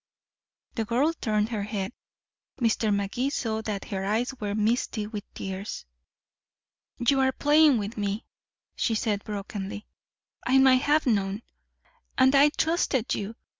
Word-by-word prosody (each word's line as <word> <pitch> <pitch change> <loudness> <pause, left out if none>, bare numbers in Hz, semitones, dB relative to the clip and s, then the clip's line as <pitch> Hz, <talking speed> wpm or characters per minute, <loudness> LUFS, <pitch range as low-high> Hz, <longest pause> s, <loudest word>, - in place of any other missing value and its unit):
The 225 - -1
girl 260 +8 +2
turned 215 -7 0
her 220 -3 -2
head. 200 +1 -3 0.7
Mr. 225 -2 +1
Magee 200 +6 0
saw 220 -5 -2
that 210 -3 -4
her 195 -3 -3
eyes 225 +6 0
were 205 -1 -2
misty 215 0 0
with 210 -1 -7
tears. 195 - -5 1.1
"You're 265 +2 +3
playing 295 0 +4
with 210 +1 -4
me," 205 +2 -2 0.5
she 225 - 0
said 210 -2 -1
brokenly. 205 -1 -5 0.6
"I 260 - +4
might 260 -1 +6
have 300 +2 +2
known. 200 -2 0 0.7
And 260 +1 +5
I 280 +1 +6
trusted 300 -6 0
you. 210 +2 -4
220 Hz, 130 wpm, -27 LUFS, 205-260 Hz, 1.1 s, might